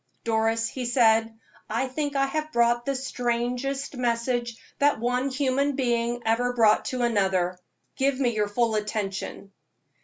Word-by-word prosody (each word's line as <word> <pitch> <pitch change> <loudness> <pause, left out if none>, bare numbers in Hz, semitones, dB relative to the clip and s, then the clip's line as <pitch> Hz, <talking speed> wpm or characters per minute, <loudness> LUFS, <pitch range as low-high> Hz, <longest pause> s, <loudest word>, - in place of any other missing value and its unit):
"Doris," 225 0 +1
he 255 +1 -5
said, 225 -2 +3 0.4
"I 230 +5 0
think 285 +2 -3
I 275 0 +3
have 310 +2 -3
brought 240 0 +2
the 275 - 0
strangest 250 +2 -2
message 240 -1 -1 0.2
that 290 -4 +3
one 250 +3 0
human 275 +1 0
being 240 -2 0
ever 245 +2 +1
brought 220 -3 +4
to 250 -1 -2
another. 190 -5 +1 0.4
Give 270 0 +1
me 245 -3 +1
your 210 -1 +1
full 225 +2 0
attention." 210 -2 -3
240 Hz, 145 wpm, -26 LUFS, 225-260 Hz, 0.4 s, brought